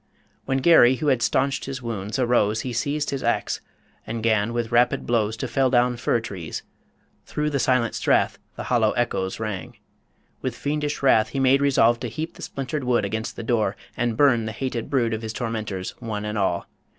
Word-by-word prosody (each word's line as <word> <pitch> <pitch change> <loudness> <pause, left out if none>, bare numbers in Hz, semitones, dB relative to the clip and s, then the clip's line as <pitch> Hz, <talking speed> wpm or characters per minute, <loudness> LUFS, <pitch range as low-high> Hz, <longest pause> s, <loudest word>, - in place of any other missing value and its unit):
_ - - -44 0.4
When 135 0 0
Garry, 130 -4 +6
who 145 +4 0
had 130 -3 +2
stanched 135 +4 +1
his 130 -2 -6
wounds, 105 -2 -4
arose, 120 -4 +2
He 125 0 -4
seized 145 +5 -1
his 135 -1 -3
axe, - - 0 0.5
and 115 0 -4
'gan 110 -1 +2
with 120 -1 -2
rapid 120 +1 +3
blows 110 -2 0
To 130 - -3
fell 130 +2 +2
down 125 0 +3
fir 120 0 +1
trees. 95 -8 -6 0.6
Through 150 0 -1
the 140 - 0
silent 125 -4 +2
strath - - +1 0.2
The - - -5
hollow 115 -4 +2
echoes 95 -6 -1
rang. 105 -4 -5 0.6
With - - -3
fiendish 150 0 -2
wrath 110 -5 +4
He 135 - -3
made 135 +1 +4
resolve 120 -4 +4
to 125 - -4
heap 155 +8 -5
the - - -14
splintered 140 +2 -4
wood 120 -4 +2
Against 110 +3 -3
the - - -6
door, 110 -3 +1 0.2
and 120 -2 -1
burn 125 -6 +4
the 110 - -4
hated 120 -1 -3
brood 120 -5 +1
Of 110 - -3
his 110 -1 -5
tormentors 110 -6 -3
one 105 -3 -4
and 105 0 -3
all. 95 -4 0
120 Hz, 200 wpm, -24 LUFS, 110-130 Hz, 0.6 s, Garry